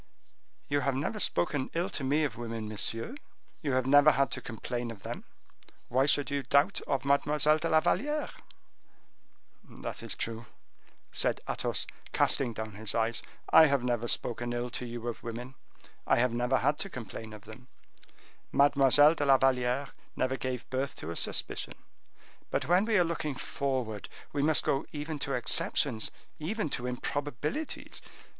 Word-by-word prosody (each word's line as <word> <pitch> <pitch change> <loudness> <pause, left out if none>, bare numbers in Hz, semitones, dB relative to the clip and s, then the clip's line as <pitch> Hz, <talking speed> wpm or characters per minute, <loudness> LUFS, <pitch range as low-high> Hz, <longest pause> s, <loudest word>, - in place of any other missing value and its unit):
"You 145 - +1
have 140 -2 0
never 155 +11 -2
spoken 130 - +1
ill 170 +2 0
to 140 - -3
me 145 +4 +2
of 150 - -2
women, 115 -2 -5
monsieur; 115 - -1 0.5
you 145 -4 -1
have 130 -1 +1
never 145 +2 +7
had 135 -3 +1
to - - -2
complain 120 +1 -5
of 110 -4 -10
them; - - -6 0.6
why 130 +3 +2
should 145 0 +2
you 140 0 0
doubt 140 +3 +2
of 135 -1 -1
Mademoiselle 150 +2 +3
de 165 +1 -2
la 155 0 +4
Valliere?" 295 - 0 1.3
"That - - -7
is - - -1
true," 115 0 -4 0.6
said - - +1
Athos, - - +1 0.3
casting 125 -3 +3
down 110 -1 -5
his 105 +1 -3
eyes; 115 0 +1 0.3
"I 160 - +9
have 140 -3 +1
never 120 -1 -1
spoken 120 +1 0
ill 120 0 -3
to 125 0 -3
you 120 0 -6
of 120 - -4
women; 120 +3 -6 0.5
I - - +5
have 120 0 +2
never 125 +2 +1
had 145 +3 +1
to 195 - -2
complain 115 - -8
of 105 -1 -11
them; 110 +4 -13 0.8
Mademoiselle 145 +1 +6
de 145 -3 -2
la 135 -1 +7
Valliere 130 +1 +1 0.3
never 130 0 0
gave 130 -2 -4
birth 130 +1 -2
to 85 - -6
a - - -5
suspicion; - - +1 0.7
but - - -1
when 180 +4 +4
we 220 -2 +2
are 180 - +5
looking 160 -4 -3
forward, 130 -7 -3 0.2
we 145 - 0
must 155 +1 +3
go 135 +1 +1
even 150 0 -5
to 135 0 -2
exceptions, 120 -1 +1 0.3
even 165 0 -2
to 125 -1 -3
improbabilities! 145 - -4
130 Hz, 165 wpm, -30 LUFS, 120-145 Hz, 1.3 s, I